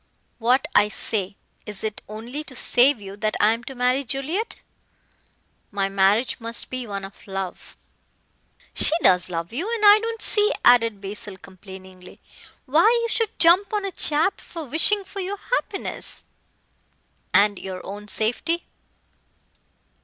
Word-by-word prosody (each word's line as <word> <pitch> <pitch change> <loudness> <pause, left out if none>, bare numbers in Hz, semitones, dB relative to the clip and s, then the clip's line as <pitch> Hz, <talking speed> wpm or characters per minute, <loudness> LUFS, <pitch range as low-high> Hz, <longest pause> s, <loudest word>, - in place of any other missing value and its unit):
"What 250 +3 +2
I 205 0 +4
say. 200 -2 -1 0.3
Is 210 -2 -7
it 215 -1 -4
only 235 +8 -7
to 260 - -11
save 250 +2 +4
you 195 -1 -9
that 215 0 -1
I 210 - +4
am 230 +1 -6
to 270 - -8
marry 250 +2 +1
Juliet? 280 - -3 1.1
My 195 -2 -1
marriage 195 +7 +1
must 230 0 -4
be 255 -2 -4
one 200 -1 -5
of 195 +2 -14
love 195 -2 -6 0.5
" - - -34
"She - - +4
does 180 0 +4
love 170 +2 -5
you. 355 - -3
And 450 -2 0
I 410 +1 +8
don't 455 +1 -4
see," 420 -1 +3
added 230 -4 +4
Basil 200 0 -6
complainingly, 190 -1 -14 0.5
"why 315 +10 +4
you 465 - -2
should 450 -1 -1
jump 350 +4 +4
on 410 -1 -1
a 390 - -3
chap 315 +2 +1
for 330 -2 -8
wishing 330 - +3
for 395 +1 -9
your 390 +2 -4
happiness 435 -2 -2 0.6
" - - -43 0.3
"And 205 -1 +4
your 185 -1 -7
own 205 +2 -8
safety." 245 +12 -1
235 Hz, 155 wpm, -23 LUFS, 200-335 Hz, 1.1 s, I